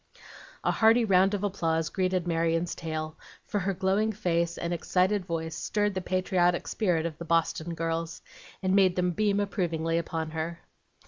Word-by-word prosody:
A -, -, +2 dB
hearty 225 Hz, +1 st, +4 dB
round 195 Hz, 0 st, +4 dB
of 205 Hz, -, -4 dB
applause 165 Hz, -5 st, 0 dB
greeted 185 Hz, -2 st, 0 dB
Marion's 165 Hz, 0 st, 0 dB
tale, 155 Hz, -1 st, -5 dB, 0.3 s
for 205 Hz, -, -1 dB
her 195 Hz, +1 st, -1 dB
glowing 195 Hz, +4 st, +1 dB
face 170 Hz, -5 st, -1 dB
and 170 Hz, +1 st, -2 dB
excited 185 Hz, +3 st, +1 dB
voice 160 Hz, -1 st, -3 dB
stirred 205 Hz, -1 st, 0 dB
the 185 Hz, -, -2 dB
patriotic 180 Hz, -1 st, +1 dB
spirit 175 Hz, -7 st, 0 dB
of 165 Hz, -2 st, -4 dB
the 170 Hz, -, -6 dB
Boston 165 Hz, 0 st, 0 dB
girls, 165 Hz, 0 st, -3 dB, 0.4 s
and 185 Hz, 0 st, +2 dB
made 190 Hz, -2 st, +4 dB
them 180 Hz, 0 st, +1 dB
beam 205 Hz, +2 st, +1 dB
approvingly 170 Hz, -5 st, 0 dB
upon 160 Hz, -1 st, -3 dB
her. 165 Hz, +1 st, -4 dB
175 Hz, 165 wpm, -28 LUFS, 165-195 Hz, 0.4 s, hearty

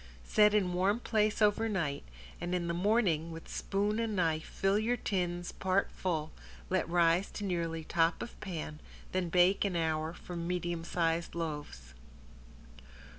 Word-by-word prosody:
Set 210 Hz, 0 st, +5 dB
in 185 Hz, -4 st, +2 dB
warm 195 Hz, +5 st, +2 dB
place 215 Hz, -2 st, +1 dB
over 210 Hz, +2 st, +3 dB
night, 165 Hz, -9 st, -1 dB, 0.4 s
and 175 Hz, +1 st, -1 dB
in 175 Hz, -1 st, -1 dB
the 170 Hz, -, 0 dB
morning 175 Hz, -4 st, +2 dB
with 165 Hz, 0 st, -9 dB
spoon 205 Hz, +2 st, -1 dB
and 225 Hz, -2 st, -1 dB
knife 160 Hz, -4 st, +1 dB
fill 195 Hz, +2 st, +1 dB
your 235 Hz, +3 st, +1 dB
tins 175 Hz, -4 st, -2 dB
part 190 Hz, +1 st, 0 dB
full, 160 Hz, -4 st, -2 dB, 0.4 s
let 185 Hz, -3 st, +1 dB
rise 170 Hz, +2 st, +3 dB
to 210 Hz, -, -6 dB
nearly 165 Hz, -4 st, -2 dB
top 165 Hz, +1 st, +1 dB
of -, -, -10 dB
pan, 160 Hz, -5 st, -5 dB, 0.3 s
then 185 Hz, -2 st, -1 dB
bake 180 Hz, +3 st, +4 dB
an 195 Hz, -3 st, -1 dB
hour 160 Hz, -1 st, 0 dB
for 175 Hz, +1 st, -9 dB
medium 175 Hz, 0 st, -2 dB
size 170 Hz, 0 st, -1 dB
loaves. 150 Hz, -, -5 dB
175 Hz, 155 wpm, -32 LUFS, 165-200 Hz, 0.4 s, Set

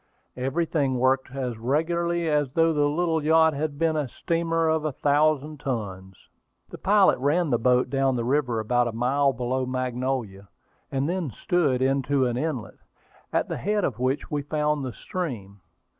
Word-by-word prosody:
Everything 140 Hz, 0 st, 0 dB
worked 130 Hz, +1 st, +2 dB
as 125 Hz, -4 st, -4 dB
regularly 170 Hz, +6 st, 0 dB
as 145 Hz, -4 st, 0 dB
though 165 Hz, 0 st, +3 dB
the 145 Hz, -1 st, +2 dB
little 160 Hz, 0 st, 0 dB
yacht 160 Hz, +1 st, +4 dB
had 145 Hz, 0 st, -3 dB
been 165 Hz, 0 st, +1 dB
a 150 Hz, -3 st, -1 dB
steamer 165 Hz, +3 st, -1 dB
of 160 Hz, -1 st, +1 dB
a 155 Hz, -, -1 dB
thousand 150 Hz, +1 st, +1 dB
tons. 95 Hz, -8 st, -5 dB, 0.4 s
The -, -, -10 dB
pilot 200 Hz, -4 st, +4 dB
ran 150 Hz, +4 st, +1 dB
the 120 Hz, -, +2 dB
boat 125 Hz, +1 st, +2 dB
down 135 Hz, -1 st, +1 dB
the 120 Hz, -, -1 dB
river 125 Hz, -3 st, +1 dB
about 120 Hz, +2 st, +1 dB
a 115 Hz, -, -4 dB
mile 135 Hz, +4 st, +2 dB
below 130 Hz, +1 st, -2 dB
Magnolia, 125 Hz, -5 st, -3 dB, 0.4 s
and 135 Hz, +1 st, 0 dB
then 175 Hz, -3 st, -2 dB
stood 135 Hz, -, 0 dB
into 135 Hz, 0 st, +1 dB
an 120 Hz, -1 st, -1 dB
inlet, 130 Hz, -4 st, -4 dB, 0.5 s
at -, -, 0 dB
the -, -, -4 dB
head 210 Hz, +1 st, 0 dB
of 120 Hz, -8 st, -2 dB
which 130 Hz, +3 st, -1 dB
we 145 Hz, -1 st, -1 dB
found 150 Hz, 0 st, -1 dB
the 130 Hz, -, -3 dB
stream. 110 Hz, -, -6 dB
140 Hz, 170 wpm, -25 LUFS, 125-160 Hz, 0.5 s, yacht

